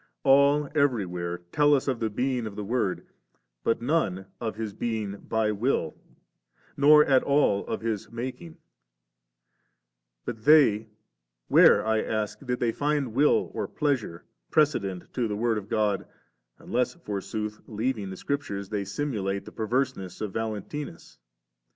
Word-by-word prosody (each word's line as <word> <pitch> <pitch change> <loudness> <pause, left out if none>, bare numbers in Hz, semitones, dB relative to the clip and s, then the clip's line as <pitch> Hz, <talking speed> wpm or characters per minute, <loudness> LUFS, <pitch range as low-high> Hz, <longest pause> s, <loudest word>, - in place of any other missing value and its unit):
All 140 +2 +5
everywhere 90 - 0
tell 145 0 +4
us 135 - -1
of 130 -4 0
the 110 - 0
being 125 +1 -1
of 100 - -8
the 105 - -4
Word, 100 -3 -1 0.6
but 115 0 0
none 120 - 0
of 115 -2 -3
His 110 -2 -4
being 110 -4 -3
* - - -20
by 110 -1 +1
will,' 105 - 0 0.8
nor 150 +2 +7
at 135 -2 +4
all 140 -8 +2
of - - -3
His 110 -3 -3
making; 130 +8 -6 1.7
but 110 -3 -6
they, 115 -8 +5 0.6
where, - - +6
I 110 0 +2
ask, 110 -1 -2
did 125 -2 -2
they 120 -2 +1
find 145 -3 -1
will 145 +5 +3
or - - -3
pleasure 130 - -2 0.2
'precedent* 100 - 0
'to 125 -3 0
the 105 - -3
Word 115 -1 +1
of 105 0 -12
God, 105 -2 0 0.5
unless 125 +5 -1
forsooth, 105 - -5
leaving 110 -2 -2
the 95 - -7
Scriptures, 100 -9 -3
they 100 -2 -2
simulate 100 -3 -2
the - - -10
perverseness 115 -4 -2
of 105 -3 -4
Valentmus? 110 - -5
115 Hz, 145 wpm, -27 LUFS, 100-135 Hz, 1.7 s, nor